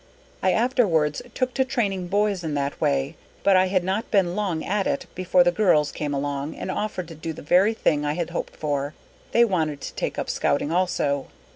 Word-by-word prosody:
_ 190 - +4
_I - - +4
afterwards 200 - +2
took 255 -1 0
to 265 - +2
training 200 -8 -1
boys 200 -1 +1
in 155 -2 -2
that 140 0 -2
way, 70 -1 +1 0.3
but 195 - +5
I 185 0 +5
had 185 -1 +1
not 195 +5 -2
been 185 -4 +2
long 190 -6 -1
at 200 +1 0
it 280 -2 -1
before 185 0 +3
the 175 - +3
girls 170 -7 +3
came 150 -2 -3
along, 140 +1 -2
and 185 - -4
offered 195 -5 -3
to - - -8
do 160 +1 -5
the - - -10
very 190 +8 +4
thing 150 -8 +1
I 145 0 0
had 170 +1 -3
hoped - - -4
for, 145 -1 -2 0.4
they 235 0 +5
wanted 160 -8 -1
to - - -6
take - - -3
up - - -2
Scouting 145 +2 0
also. 165 -6 0
180 Hz, 215 wpm, -24 LUFS, 150-200 Hz, 0.4 s, but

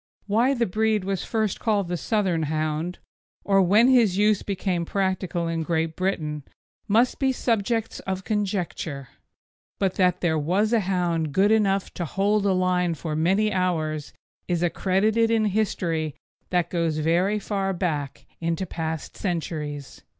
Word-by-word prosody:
Why 235 +7 +2
the 235 -2 +1
breed 215 +1 +1
was 195 0 -2
first 220 -3 -1
called 205 -4 +1
the 175 - -2
Southern 185 -3 0
Hound, 155 +3 -2 0.5
or 195 -1 +4
when 205 +6 +5
his 235 -8 +4
use 210 -1 +3
became 185 -3 -2
practical 185 -2 -1
in 165 0 -1
Great 160 0 -1
Britain, 155 -6 -2 0.5
must 230 +4 +2
be 270 -2 +2
subjects 225 -2 -1
of 190 0 -4
conjecture; 185 - -3 0.7
but 195 -2 0
that 180 -2 +2
there 160 -3 +1
was 195 +9 +1
a 230 - +5
hound 175 -5 -1
good 200 +6 +4
enough 200 -3 +2
to 175 - -3
hold 200 +4 +1
a - - +3
line 180 -2 +1
for 155 0 -4
many 195 +7 +2
hours 155 -5 -1 0.4
is 175 -1 0
accredited 205 +6 +2
in 225 -1 +2
history 170 -7 -1 0.3
that 175 -2 0
goes 165 -3 0
very 175 +7 +2
far 195 -2 -2
back 155 -7 -3
into 165 +2 -1
past 160 -3 -5
centuries. 155 -6 -4
185 Hz, 150 wpm, -25 LUFS, 165-210 Hz, 0.7 s, when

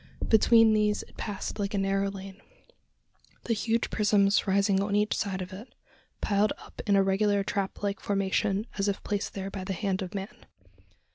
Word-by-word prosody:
Between 225 0 +6
these 210 -1 +1
it - - -19
passed 205 0 -5
like 200 +1 -2
a - - 0
narrow 195 0 +1
lane, 195 0 -9 1.0
the 235 - 0
huge 225 +1 0
prisms 205 -1 +3
rising 195 0 +3
on 200 0 -1
each 210 +1 +2
side 190 -3 -2
of 185 +1 -10
it, 210 +7 -11 0.5
piled 205 +1 +2
up - - -11
in 200 - +4
a 195 - +5
regular 200 +1 +2
trap 195 0 -3
like 200 -1 -1
formation, 195 +1 0
as 195 - +1
if 200 - -2
placed 205 -1 -3
there 195 0 -4
by 190 -1 -5
the 195 +1 -3
hand 190 +1 -2
of 185 +1 -6
man! 195 +1 -7
200 Hz, 185 wpm, -28 LUFS, 195-210 Hz, 1.0 s, Between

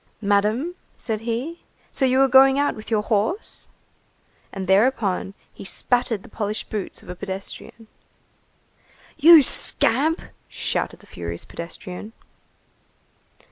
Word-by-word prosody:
"Madam," 210 - +1 0.2
said 220 -3 -3
he, 240 +9 -4 0.3
"so 270 - 0
you 260 0 +2
are 270 - +5
going 265 +1 +6
out 285 0 +1
with 215 - -10
your 215 -2 +1
horse?" 220 - -2 0.8
And 195 -1 -5
thereupon, 195 -1 +1 0.2
he - - -11
spattered 235 +1 -1
the - - -13
polished 210 0 -4
boots 210 -3 -5
of - - -15
a - - -4
pedestrian. 195 +4 -8 1.3
"You 315 0 +8
scamp!" 285 +6 +2 0.3
shouted - - -3
the - - -18
furious 85 - -7
pedestrian. 180 +5 -8
225 Hz, 120 wpm, -23 LUFS, 200-265 Hz, 1.3 s, You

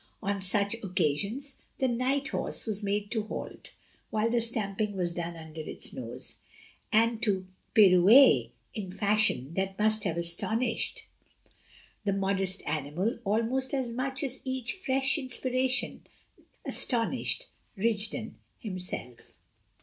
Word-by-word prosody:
On 200 0 -1
such 200 +2 +2
occasions 200 - -1 0.2
the 265 - +2
night 260 +4 0
horse - - -2
was 215 -2 -2
made 205 +1 -1
to 225 - 0
halt - - -7 0.3
(while 220 +2 +1
the 240 0 +2
stamping 210 -3 0
was 175 -2 0
done 170 0 -4
under 160 -1 -8
its 155 - -4
nose) - - -6 0.5
and 230 +1 +3
to 190 -4 +1 0.3
pirouette 190 - +7 0.2
in 195 -4 -5
fashion 200 - +2
that 190 +1 -2
must 215 0 +3
have 170 -3 -1
astonished 220 +8 0 1.0
the 200 -2 +1
modest 195 -1 0
animal 160 - -1
almost 230 +6 +1
as 255 -3 -1
much 265 +3 -2
as 265 -1 -2
each 260 - -2
fresh 270 -6 +1
inspiration 255 -1 -1 0.6
astonished 235 -3 +1 0.3
Rigden 220 +2 -1 0.2
himself. 180 - -6
215 Hz, 120 wpm, -29 LUFS, 190-245 Hz, 1.0 s, pirouette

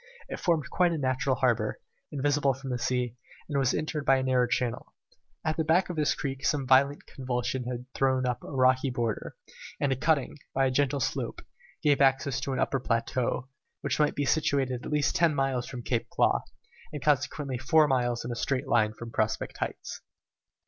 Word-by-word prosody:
It - - -5
formed 160 -6 +1
quite 180 -1 +3
a - - -1
natural 130 -1 0
harbour, 125 -4 +1 0.3
invisible 145 -1 +1
from 135 0 -7
the 125 - -2
sea, 125 -1 -1 0.3
and 145 -2 0
was 130 -2 +2
entered 155 -1 -2
by 135 -1 +4
a 130 - -1
narrow 130 -1 +2
channel. 120 -2 -2 0.5
At 155 0 0
the 160 - +1
back 175 +4 +2
of - - -6
this 150 -2 +1
creek 135 -1 -4
some 145 -3 +1
violent 135 +3 +3
convulsion 125 -1 -3
had 125 0 -4
torn 130 -1 +1
up 125 -1 -1
the - - -10
rocky 130 0 +3
border, 120 -3 -3 0.4
and 140 - +1
a - - +2
cutting, 150 +1 0 0.2
by 135 0 +3
a 130 - +1
gentle 140 +1 +1
slope, - - -2 0.4
gave 145 -2 +3
access 135 -1 +3
to 135 +1 -3
an 130 - -1
upper 135 - +1
plateau, 125 +2 -1 0.3
which 140 0 -1
might 150 - +2
be 145 - 0
situated 135 -5 +1
at - - -6
least 150 -1 +1
ten 165 -3 +3
miles 135 -3 0
from 125 -2 -7
Claw 120 -1 0 0.4
Cape, - - -20 0.4
and 150 -3 -6
consequently 145 -2 0
four 150 +4 +4
miles 120 -3 0
in 120 - -3
a - - -3
straight 135 +3 -1
line 110 -3 +2
from 115 0 -8
Prospect 110 -1 -1
Heights. - - -5
135 Hz, 195 wpm, -28 LUFS, 125-145 Hz, 0.5 s, by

